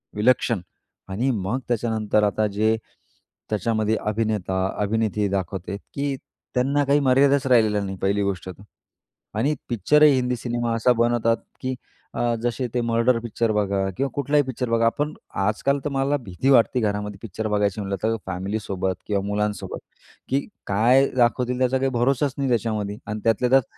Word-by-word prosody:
विलक्षण 115 -1 +2 0.5
आणि 115 +8 0
मग 105 +2 -1
त्याच्यानंतर 110 -3 +1
आता 105 +1 +1
जे 110 +2 +1 0.7
त्याच्यामध्ये 110 0 0
अभिनेता-अभिनेत्री 105 0 0
दाखवते, 95 0 -3 0.2
की 140 -1 -1 0.4
त्यांना 140 +3 +2
काही 140 +1 +3
मर्यादाच 135 +2 +4
राहिलेला 110 -5 +4
नाही 95 -1 -5
पहिली 100 +1 +1
गोष्ट 95 -2 -3
तर. 95 +2 -10 0.8
आणि 145 +6 +1
पिक्चरही 145 +7 +5
हिंदी 125 -1 0
सिनेमा 120 0 -2
असा 115 +2 +3
बनवतात, 115 -1 +2 0.2
की 130 0 -2 0.4
अ, 120 -1 0
जसे 120 +1 -1
ते 125 - +1
मर्डर 115 +1 +2
पिक्चर 115 0 -1
बघा 100 -2 0
किंवा 135 0 0
कुठलाही 145 +1 +2
पिक्चर 125 -2 -4
बघा. 115 0 +2
आपण 145 +6 0 0.3
आजकाल 110 +7 +1
तर - - +1
मला 140 +1 +1
भीती 100 +6 -2
वाटते 125 -1 +4
घरामध्ये 105 -2 -2
पिक्चर 110 +1 -4
बघायची 105 -1 0
म्हटलं 100 -1 -3
तर 115 +1 +2
फॅमिलीसोबत 95 0 -2
किंवा 100 -1 0
मुलांसोबत, 105 0 -2 0.5
की 135 - +2 0.3
काय 120 +7 +4
दाखवतील 125 +1 +2
त्याचा 130 0 +2
काही 135 0 +1
भरोसाच 130 +3 +1
नाही 135 -1 0
त्याच्यामध्ये 110 -3 -1
आणि 105 0 -3
त्यातल्या 115 +2 +2
त्यात, 135 0 +6
115 Hz, 150 wpm, -23 LUFS, 105-125 Hz, 0.8 s, त्यात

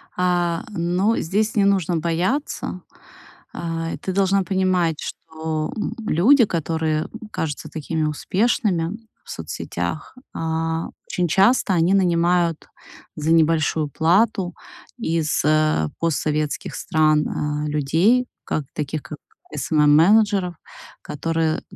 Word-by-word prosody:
А, 175 -2 0
но 185 +3 0
здесь 210 +6 0
не 200 -2 +3
нужно 185 -4 +2
бояться. 175 - -2 0.7
А, 165 -1 -3
и - - -5
ты 190 - -4
должна 195 0 +2
понимать, 185 -3 +1
что, 160 -1 -4
м, 215 - -3
люди, 235 - +5
которые 160 -3 -1 0.2
кажутся 150 -3 -4
такими 160 0 -3
успешными 185 - 0 0.3
в - - -10
соцсетях, - - -5 0.2
а, 160 0 -2 0.2
очень 180 -1 -1
часто 195 +4 +3
они 175 +2 +3
нанимают 175 -3 +2 0.5
за 155 +1 -1
небольшую 160 -1 +2
плату 180 - +2 0.4
из, 165 -8 0
э, 155 - +2
постсоветских 155 -1 -1
стран, 155 -3 +2
а, 150 0 -2
людей, 165 - +2 0.2
как 155 - -2
таких 150 0 -4
как 150 - -8 0.4
SMM-менеджеров, 175 - +3 0.5
которые, 160 +1 -1
165 Hz, 110 wpm, -22 LUFS, 155-190 Hz, 0.7 s, люди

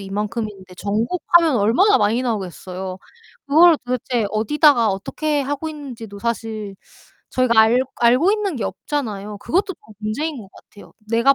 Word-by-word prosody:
이만큼인데 200 -1 -5
전국하면 320 - +2
얼마나 240 - +4
많이 220 +4 +1
나오겠어요. 190 -4 -4 0.5
그걸 325 +3 +6
도대체 245 -2 -1
어디다가 240 +2 +3
어떻게 290 +10 -2
하고 290 +3 -3
있는지도 245 -9 -9
사실 220 -2 -4 0.6
저희가 245 -3 +3
알 225 +3 +4 0.2
알고 250 +10 +4
있는 420 -4 -1
게 230 - -4
없잖아요. 210 -8 -4
그것도 380 - -1
좀 220 -8 -19
문제인 265 +9 -3
것 200 - -13
같아요. 205 - -17 0.2
내가 235 +5 +4
235 Hz, 345 characters per minute, -20 LUFS, 210-295 Hz, 0.6 s, 그걸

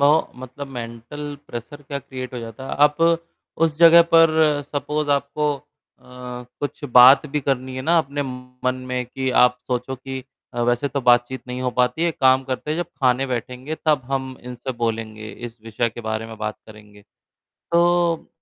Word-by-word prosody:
म 150 +3 +5 0.2
मतलब 130 +3 -8
mental 120 +5 -7
pressure 120 +5 -8
क्या 140 0 -5
क्रिएट 130 -1 -7
हो - - -3
जाता 115 +3 -8
है। - - -4
आप 150 - -6 0.7
उस 160 -2 +2
जगह 170 0 +9
पर 165 -1 +7 0.4
सपोज़ 150 +1 -2
आपको 145 +1 0
अ, 135 - -18 1.0
कुछ 145 0 -4
बात 125 +4 +8
भी 150 - 0
करनी 130 -1 -2
है 130 - -4
ना 170 +5 +3
अपने 145 -2 -1
मन 125 -1 -4
में 125 0 -1
कि 130 +2 -3
आप 125 0 +4
सोचो 125 +1 -2
कि 130 0 -7 0.3
अ, 120 - -2
वैसे 120 +4 +1
तो 140 - -2
बातचीत 120 +1 +3
नहीं 125 0 -4
हो 125 - 0
पाती 125 +6 +1
है। 170 - +3
एक 165 - -5
काम 130 0 +5
करते 130 +3 -4
हैं 155 - 0
जब 175 - -1 0.2
खाने 130 +1 +3
बैठेंगे 125 +3 -4
तब 150 -4 +3
हम 130 -1 -2
इनसे 125 +1 -6
बोलेंगे। 110 -1 -3
इस 120 -1 -9
विषय 115 +1 -1
के 120 - -9
बारे 110 0 -2
में 115 0 -9
बात 110 0 -3
करेंगे। 105 -1 -15 0.7
तो 170 -1 +2
130 Hz, 180 wpm, -22 LUFS, 120-145 Hz, 1.0 s, जगह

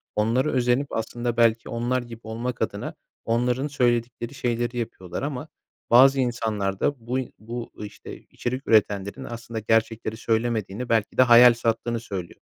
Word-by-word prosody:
onlara 115 +7 +2
özenip, 125 +2 +1
aslında 120 +1 -2
belki 115 -1 +3
onlar 120 +2 -1
gibi 120 -1 -10
olmak 115 +3 -4
adına, - - -3 0.3
onların 125 +4 +1
söyledikleri 120 -2 0
şeyleri 120 -1 -2
yapıyorlar. 95 -6 -5
Ama 145 +1 -4 0.4
bazı 135 +3 +7
insanlar 110 -6 -1
da 125 -5 -1
buy 130 0 -1
bu, 115 +2 -6
işte, 105 -1 -9
içerik 130 +3 -5
üretenlerin 100 -2 +2
aslında 115 -1 -6
gerçekleri 110 0 0
söylemediğini, 115 0 -1
belki 110 -2 +1
de - - +7
hayal 120 0 +8
sattığını 115 0 -1
söylüyor. 95 -6 -7
120 Hz, 140 wpm, -25 LUFS, 110-125 Hz, 0.4 s, hayal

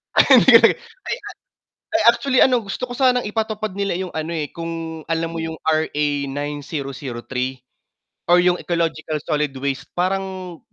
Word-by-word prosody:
Ay - - +7
ay - - +7 1.2
ay 330 - +4
actually 260 +1 0
ano 250 -3 +3
gusto 225 +6 -4
ko - - -10
sanang 250 -2 +3
ipatupad 215 -1 -2
nila 200 0 -1
yung 185 -2 -4
ano 160 +1 -3
eh, 155 -3 -2
kung 165 -1 -5
alam 165 0 0
mo 165 - -3
yung 160 0 -5
RA9003 140 -4 -2 0.7
or 175 - +7
yung 180 0 +3
ecological 165 -2 -2
solid 150 -1 0
waste 135 0 -3
parang, 185 -1 -2
165 Hz, 135 wpm, -21 LUFS, 145-195 Hz, 1.2 s, Ay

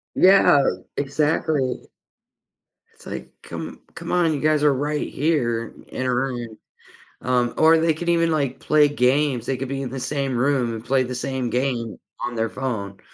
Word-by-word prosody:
Yeah, 190 -6 +6 0.4
exactly. 145 -1 0 1.1
It's, - - -20
like, - - -7
come - - -8
come - - -6
on, 170 -3 +2
you 145 - -2
guys 155 0 +2
are 145 -2 +5
right 145 +3 -2
here 120 -7 0
in - - -16
in 130 - -5
a 125 - +1
room. 120 -3 -3 0.6
Um, 125 -1 +1
or 160 +1 +6
they 165 -1 +2
could 170 +1 -3
even, 165 -1 +3
like, 140 -4 -1
play 150 -1 +4
games, 135 -2 +1
they 135 - -1
could 135 0 -4
be 135 0 -3
in 130 - -4
the 130 +1 -5
same 135 -1 -2
room 130 -2 +1
and 115 +1 -7
play 130 +1 +2
the 125 0 -5
same 130 -1 -2
game 125 -3 -2 0.2
on 120 -2 -4
their 115 0 0
phone. 105 -7 -4
135 Hz, 180 wpm, -22 LUFS, 125-150 Hz, 1.1 s, Yeah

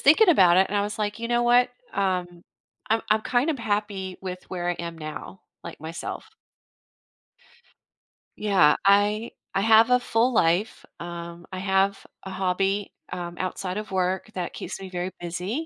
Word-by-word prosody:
thinking 345 +9 +6
about 185 - +6
it, 190 +1 +4
and 205 - -1
I 200 - +2
was 210 +1 -4
like, 210 +1 -2
"You 230 - -3
know 240 0 +2
what, 245 +1 +5 0.2
um, 180 -3 -2 0.5
I'm 225 0 +2
I'm 215 0 +3
kind 250 +7 +1
of 295 - -2
happy 205 -4 -2
with 185 -1 -6
where 175 -1 -3
I - - -1
am 170 -1 -6
now, 155 +4 -8 0.2
like - - -9
myself." 170 - -7 2.0
Yeah, 190 -8 +4
I 205 +3 +3 0.2
I 195 - +1
have 225 +2 +6
a 250 0 +5
full 245 +1 +1
life, 180 +2 +1
um, 170 0 -7
I 185 - -5
have 195 +1 +1 0.2
a 190 - -7
hobby, 195 +2 -1 0.2
um, 175 -1 -5
outside 185 0 -3
of 215 -1 -5
work 190 +3 -1
that 180 -2 -4
keeps - - -6
me 190 - -8
very 180 0 -3
busy 180 - -3
195 Hz, 170 wpm, -25 LUFS, 180-220 Hz, 2.0 s, thinking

